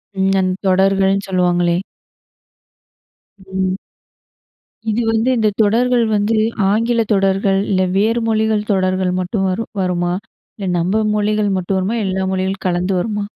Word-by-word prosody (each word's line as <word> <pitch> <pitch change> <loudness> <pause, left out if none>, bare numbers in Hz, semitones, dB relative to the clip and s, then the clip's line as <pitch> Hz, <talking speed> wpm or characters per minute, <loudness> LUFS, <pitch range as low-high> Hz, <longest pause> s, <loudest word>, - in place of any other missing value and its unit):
ம். 190 0 +1
அந்த 185 0 0
தொடர்கள்ன்னு 195 +1 +2
சொல்லுவாங்களே? 175 -2 +1 1.7
ம். 190 0 -2 1.1
இது 220 +2 0
வந்து 225 +3 +1
இந்த 215 -1 +2
தொடர்கள் 240 +3 +2
வந்து 210 +2 +1 0.4
ஆங்கிலத்தொடர்கள், 205 -4 +1
இல்ல 185 -1 +2 0.2
வேறு 225 +4 +2
மொழிகள் 220 -1 0
தொடர்கள் 185 -1 0
மட்டும் 190 +2 -1
வரும் 220 +5 -3
வருமா? 175 -1 0 0.4
இல்ல 200 -3 -4
நம்ம 190 +6 +1
மொழிகள் 210 0 +1
மட்டும் 185 +1 -1
வருமா? 205 +5 -1
எல்லா 190 0 -1
மொழிகளும் 190 +1 -2
கலந்து 180 +2 0
வருமா? 210 +1 -2
195 Hz, 120 wpm, -18 LUFS, 185-215 Hz, 1.7 s, தொடர்கள்ன்னு